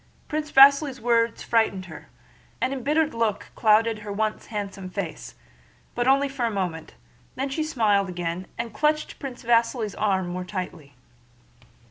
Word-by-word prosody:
Prince 305 0 -3
Vasíli's 275 0 +6
words 230 0 +1
frightened 220 -5 +1
her, 155 -4 -11 0.5
an 255 +1 0
embittered 300 +4 0
look 230 -3 -1
clouded 220 0 +3
her 205 -1 -7
once 215 +1 -2
handsome 200 -3 -5
face, - - -6 0.6
but 240 +1 -1
only 275 +1 +4
for 270 -2 -4
a 235 - +2
moment; 180 - -4 0.4
then 270 +2 -2
she 310 +4 -1
smiled 215 -10 +1
again 175 0 -4
and 235 -2 -4
clutched 305 +3 0
Prince 265 -3 -7
Vasíli's 230 -2 +1
arm 190 -3 0
more 180 +1 -4
tightly. 180 -7 -6
230 Hz, 145 wpm, -25 LUFS, 195-270 Hz, 0.6 s, Vasíli's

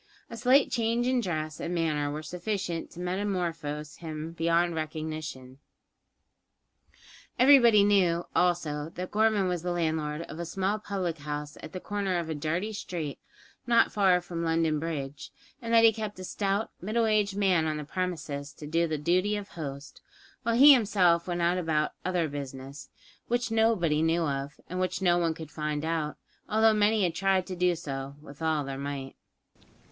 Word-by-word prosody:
A - - -5
slight 255 +5 +4
change 235 0 +1
in 255 0 +2
dress 155 -6 -3
and 175 - -3
manner 155 -3 0
were 150 +2 -5
sufficient 180 0 -3
to 175 - -12
metamorphose 175 -6 -3
him 160 -1 -6
beyond 170 +1 +1
recognition. 155 -4 -5 1.8
Everybody 240 -6 +7
knew, 180 -4 +3
also, 160 -4 +1
that 180 +1 -5
Gorman 215 -2 +2
was 180 -2 -1
the 180 - -3
landlord 160 -2 -1
of 160 - -9
a - - -2
small 195 +4 -1
public 185 -6 -3
house 150 +1 -5
at 155 - -9
the 185 - -5
corner 200 -2 -2
of 170 -2 -3
a - - -1
dirty 165 +8 -2
street, 170 -8 -5 0.5
not 235 -1 +4
far 190 -3 +3
from 170 -1 -5
London 165 -2 +1
Bridge; 145 -3 -5 0.3
and 230 -1 -4
that 230 0 +6
he 225 -1 +7
kept 215 -2 -5
a 185 - -7
stout, 200 +3 -1
middle 220 +5 +1
aged 210 -2 +1
man 185 -5 +3
on 155 -1 -1
the 150 - -4
premises 150 -4 -4
to 150 - -10
do 165 +3 +1
the 155 -1 -2
duty 185 +7 +1
of 205 -1 -5
host, 140 -3 -8 0.4
while 230 0 0
he 280 +4 +10
himself 190 -8 +3
went 175 -1 -2
about 165 -3 +1
"other 180 -3 0
business," 140 -1 -7 0.4
which 240 0 -1
nobody 220 -9 +2
knew 165 +1 +2
of, 140 -1 -3
and 180 - -4
which 185 0 -1
no 175 -2 +3
one 165 -2 0
could 160 -2 -9
find 150 -1 -3
out, 160 -2 -2 0.3
although 220 +1 +4
many 210 0 +3
had 175 -2 +1
tried 190 +1 +1
to 185 - -5
do 180 0 +2
so 140 -3 -6
with 145 0 -13
all 160 -2 +1
their 135 0 -5
might. 140 -1 -5
170 Hz, 170 wpm, -28 LUFS, 155-200 Hz, 1.8 s, he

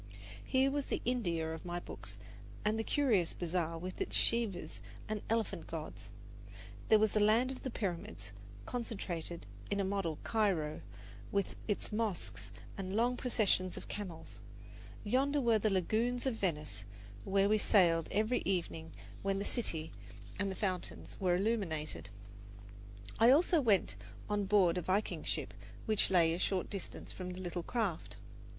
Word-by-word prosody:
Here 265 - +3
was 285 -1 -1
the - - -1
India 170 -10 0
of 160 - -7
my 175 0 -3
books - - -6 0.5
in 210 +1 +3
the 225 - 0
curious 225 - +2
bazaar 170 -1 -1
with 180 +3 -6
its - - -1
Shivas 225 -6 +1 0.3
and 215 -1 -2
elephant 225 0 0
gods; - - -6 0.8
there 220 - +8
was 215 -1 +3
the 215 - +2
land 225 +5 +4
of 265 - -7
the 260 - -3
Pyramids 170 - -4 0.3
concentrated 180 -8 -4 0.2
in 200 - 0
a - - +2
model 190 -5 -1
Cairo 185 -9 +1 0.5
with 200 -1 0
its 205 - -1
mosques 210 -4 -2 0.3
and 190 - -3
its 190 - -3
long 240 +2 +3
processions 205 -7 +1
of - - -8
camels; 185 -6 -7 0.6
yonder 270 +7 +2
were 230 -4 +4
the 215 - +2
lagoons 220 +7 +1
of 265 - +2
Venice, 150 - -2 0.4
where 195 0 +3
we 215 +1 +4
sailed 170 -6 +4
every 220 +4 +2
evening 165 -3 -2 0.3
when 195 0 0
the 200 - -2
city 165 -10 -2 0.5
and 200 -1 0
the - - -4
fountains 185 -3 -3
were 180 -3 +3
illuminated. 180 - -1 1.1
I 230 - +8
also 315 +4 +5
went 195 - +3 0.3
on 205 -1 0
board 190 -3 +4
a - - -3
Viking 190 +5 0
ship - - -2 0.3
which 215 -2 +3
lay 170 -3 +5
a 170 - -2
short 185 -1 0
distance 195 -3 -6
from 185 -1 -6
the 180 - -7
little 175 -1 -3
craft. 205 -4 -2
200 Hz, 155 wpm, -34 LUFS, 175-225 Hz, 1.1 s, there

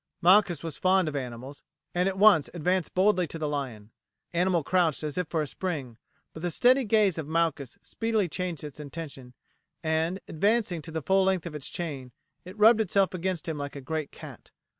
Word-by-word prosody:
Malchus 185 -1 +4
was 165 -3 -5
fond 185 -2 +3
of 150 - -3
animals, 130 +1 -6 0.3
and 180 +2 +2
at 190 - -5
once 195 -7 +6
advanced 180 +1 -1
boldly 185 -2 +3
to 165 - -5
the 155 -1 -2
lion. 125 -8 -5 0.4
The 170 - -5
animal 180 -3 +2
crouched 170 -3 +1
as 150 -2 -3
if 180 -2 -1
for 160 -1 -1
a - - -5
spring, 140 -9 -5 0.3
but 160 - -9
the 175 - -1
steady 250 - +3
gaze 205 -5 +3
of 150 - -5
Malchus 160 -5 -1
speedily 225 -4 -1
changed 175 -1 -4
its 150 0 -8
intention, 140 -4 -8 0.5
and, 160 +3 0
advancing 200 0 +1
to 160 - -8
the 160 -1 -4
full 190 +3 +3
length 190 -2 +1
of 170 - -6
its 150 -3 -6
chain, 140 -8 -5 0.3
it 185 +3 -10
rubbed 220 +1 +6
itself 195 -2 +2
against 185 -2 -3
him 160 -2 -3
like 145 0 -5
a - - -5
great 155 +2 -4
cat. - - -12
165 Hz, 200 wpm, -27 LUFS, 150-190 Hz, 0.5 s, once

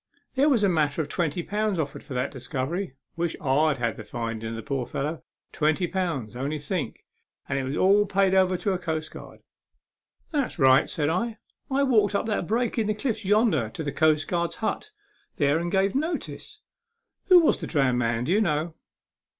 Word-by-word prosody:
" - - -47
There 280 +3 +3
was 240 -7 +3
a - - +5
matter 155 -3 +1
of 145 - -10
twenty 170 0 -1
pound 210 0 -1
offered 150 -3 -3
for 130 - -8
that 125 +2 -1
discovery. 135 +5 -4 0.2
Wish 170 -1 -1
Td 145 +1 +2
had 115 -3 -1
the - - -7
finding 115 -1 -4
of 115 - -5
the 115 - -6
poor 130 0 -2
fellow. 150 +5 -3 0.3
Twenty 155 +4 +1
pound. 165 - -3
Only 140 +5 -2
think. 145 -2 -4 0.4
And - - -1
it - - -2
was 135 +2 -3
all 200 +2 +4
paid 195 0 +2
over 185 -1 +3
to 200 +2 -1
a 180 - -2
coastguard." 160 -3 -5 0.5
" - - -47
That's 280 -8 -1
right," 130 -3 +5
said 150 -1 0
I. 225 +7 -1 0.2
" - - -65
I 275 +1 +2
walked 215 -6 +3
up - - 0
that 210 -6 -1
break 235 +2 0
in 215 - 0
the 215 - 0
cliffs 220 -1 -2
yonder 195 - +2
to 160 - -6
the 145 - -2
coastguard's 155 +3 +1
hut 230 - -3 0.5
there 145 +1 +2
and 170 +1 -3
gave 195 0 +2
notice. 315 +5 -3 0.6
Who 365 -2 +8
was 320 - +3
the - - -5
drowned 135 -5 +2
man, 115 -1 0
do 165 - +1
you 210 - +3
know?" 160 -3 0
165 Hz, 200 wpm, -26 LUFS, 140-205 Hz, 0.6 s, Who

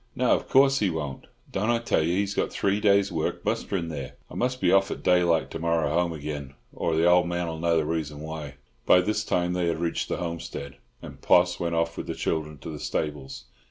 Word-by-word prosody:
"No, 125 -1 +2
of - - +1
course 135 +1 +5
he 100 - +2
won't. 75 -5 -5 0.2
Don't 105 +4 -1
I 120 - +3
tell 115 -7 +1
you 80 +2 +1
he's 100 +1 0
got - - -1
three 100 +1 0
days' 100 -1 +3
work 80 -2 -2
musterin' 85 -4 -1
there? 70 -5 -6 0.2
I - - -9
must 125 +1 -1
be - - +3
off 95 +1 +4
at - - -6
daylight 85 -2 +3
to - - -5
morrow, 80 -2 +1
home 85 0 +1
again, 75 -3 -6 0.2
or 80 - -1
the 80 +1 +3
old 90 0 +5
man'll 85 -2 -3
know 85 0 +2
the 80 - +1
reason 75 -2 -3
why." 75 -2 -7 0.3
By 90 - +7
this 105 +3 -1
time 90 -3 0
they 90 -1 0
had 85 - 0
reached 85 0 -2
the - - -1
homestead, 85 -6 -5 0.3
and - - -10
Poss 90 0 +4
went 85 -1 -1
off 85 0 0
with - - -5
the - - -3
children 75 -2 -2
to - - -5
the 75 - -7
stables. 70 -3 -4
85 Hz, 230 wpm, -26 LUFS, 80-90 Hz, 0.3 s, By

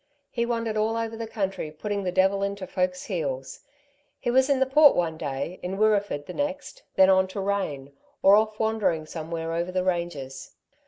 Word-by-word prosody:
He 235 -1 -1
wandered 230 -2 -1
all 220 +1 +1
over 225 0 -3
the 225 0 -5
country 195 -7 -3
putting 200 +6 -4
the 180 - -1
devil 190 +2 +2
into 200 -1 -2
folks' 180 0 -1
heels. 140 -9 -4 0.6
He 240 - -1
was 260 +2 +4
in 275 -2 +3
the 265 - +4
Port 290 +2 +6
one 165 -2 0
day, 145 +3 -4
in 185 +2 -4
Wirreeford 205 -8 +1
the - - -8
next, 290 - -4
then 190 0 +7
on 190 0 +4
to 190 +2 -6
Rane, 190 -9 -2 0.3
or 195 +1 +8
off 215 0 +1
wandering 215 -8 0
somewhere 165 +1 -5
over 170 +2 -2
the 185 0 0
ranges. 170 -7 -3
190 Hz, 190 wpm, -26 LUFS, 165-220 Hz, 0.6 s, or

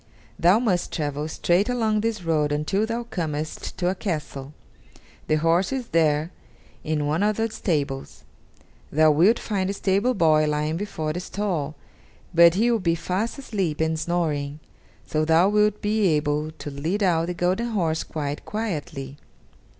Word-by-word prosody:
Thou 175 +5 +5
must 200 -7 0
travel 150 -1 -2
straight 175 +6 +1
along 220 -3 +1
this 220 -4 -2
road 155 -3 +1
until 170 +9 0
thou 235 +1 -2
comest 155 -8 -4
to 175 - 0
a 185 - +2
castle; 150 -7 -4 0.8
the 155 - +3
horse 165 - +2
is 260 -3 -3
there 155 0 +2 0.5
in 150 -1 -1
one 155 +5 0
of 210 0 +1
the 225 0 0
stables. 145 -9 -3 0.7
Thou 155 +1 +5
wilt 180 +10 +4
find 195 -3 -2
a - - -1
stable 200 +6 +1
boy 155 -4 +4
lying 150 +1 0
before 160 -5 -3
the 175 - -3
stall, 180 -6 -3 0.6
but 170 0 +7
he 230 +5 +3
will 230 - +2
be 170 -3 +1
fast 190 - -2
asleep 195 - -2
and 160 0 0
snoring, 155 -4 -1 0.5
so 155 0 0
thou 165 +3 +4
wilt 210 0 +2
be 210 -1 +2
able 150 -1 0
to 155 -2 -8
lead 165 +9 -2
out 165 -3 +2
the 180 - -3
golden 185 +7 0
horse 170 -8 0
quite 145 -2 -4
quietly. 155 -10 -4
170 Hz, 160 wpm, -24 LUFS, 155-205 Hz, 0.8 s, but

